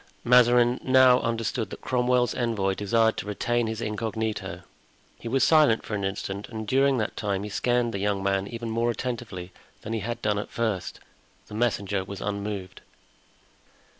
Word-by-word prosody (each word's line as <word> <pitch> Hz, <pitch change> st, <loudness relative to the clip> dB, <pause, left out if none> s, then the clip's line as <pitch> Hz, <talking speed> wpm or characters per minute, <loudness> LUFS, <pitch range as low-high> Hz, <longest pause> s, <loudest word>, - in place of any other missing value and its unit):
Mazarin 120 Hz, 0 st, +5 dB
now 130 Hz, -1 st, +6 dB
understood 115 Hz, -1 st, -2 dB
that -, -, -9 dB
Cromwell's 125 Hz, -1 st, +1 dB
envoy 110 Hz, -6 st, 0 dB
desired 110 Hz, +3 st, +2 dB
to -, -, -5 dB
retain 120 Hz, +3 st, 0 dB
his 110 Hz, 0 st, -4 dB
incognito. 110 Hz, 0 st, -3 dB, 0.6 s
He -, -, -7 dB
was 130 Hz, +2 st, +2 dB
silent 150 Hz, -8 st, +4 dB
for -, -, -6 dB
an 100 Hz, -1 st, -2 dB
instant, 95 Hz, +1 st, -4 dB
and 110 Hz, -2 st, -6 dB
during 135 Hz, +2 st, +3 dB
that 110 Hz, -, -2 dB
time 100 Hz, -2 st, -2 dB
he 105 Hz, -, -6 dB
scanned 120 Hz, +1 st, +1 dB
the 100 Hz, -, -2 dB
young 100 Hz, -1 st, 0 dB
man 100 Hz, 0 st, 0 dB
even 115 Hz, 0 st, -5 dB
more 115 Hz, +1 st, +1 dB
attentively 115 Hz, -7 st, -4 dB, 0.3 s
than 110 Hz, -, -4 dB
he 115 Hz, -, -1 dB
had 120 Hz, +3 st, -4 dB
done 105 Hz, -1 st, +1 dB
at 105 Hz, -, -6 dB
first. 110 Hz, -6 st, -2 dB, 0.5 s
The -, -, -10 dB
messenger 100 Hz, -4 st, 0 dB
was 95 Hz, 0 st, -8 dB
unmoved. 100 Hz, -2 st, -4 dB
110 Hz, 165 wpm, -26 LUFS, 100-120 Hz, 0.6 s, now